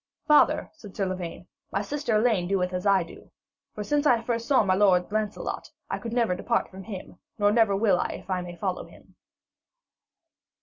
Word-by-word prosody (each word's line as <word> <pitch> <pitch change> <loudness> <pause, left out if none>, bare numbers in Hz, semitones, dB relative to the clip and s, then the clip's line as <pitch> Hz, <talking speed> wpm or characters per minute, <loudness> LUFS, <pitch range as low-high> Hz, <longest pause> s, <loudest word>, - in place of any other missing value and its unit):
'Father,' 300 -2 +4
said 215 -11 -13
Sir 200 - 0
Lavaine, 185 -2 -5 0.3
'my 195 - -1
sister 280 0 -1
Elaine 215 -5 +2
doeth 185 -1 0
as 180 +2 -2
I 195 -2 +4
do. 165 - -14 0.5
For 210 - -4
since 295 +6 +1
I 235 -4 +4
first 230 0 -2
saw 270 -4 +4
my 190 -2 +2
lord 185 -2 +3
Lancelot, 215 -1 -3 0.2
I - - -2
could 230 - -6
never 235 -5 +2
depart 230 +6 -1
from 190 0 -9
him, 195 -4 -8 0.2
nor 205 -1 +3
never 220 -3 +3
will 195 -3 +3
if - - -8
I 185 -2 -1
may 175 -1 -8
follow 185 +1 -3
him.' - - -18
205 Hz, 185 wpm, -26 LUFS, 185-230 Hz, 0.5 s, Father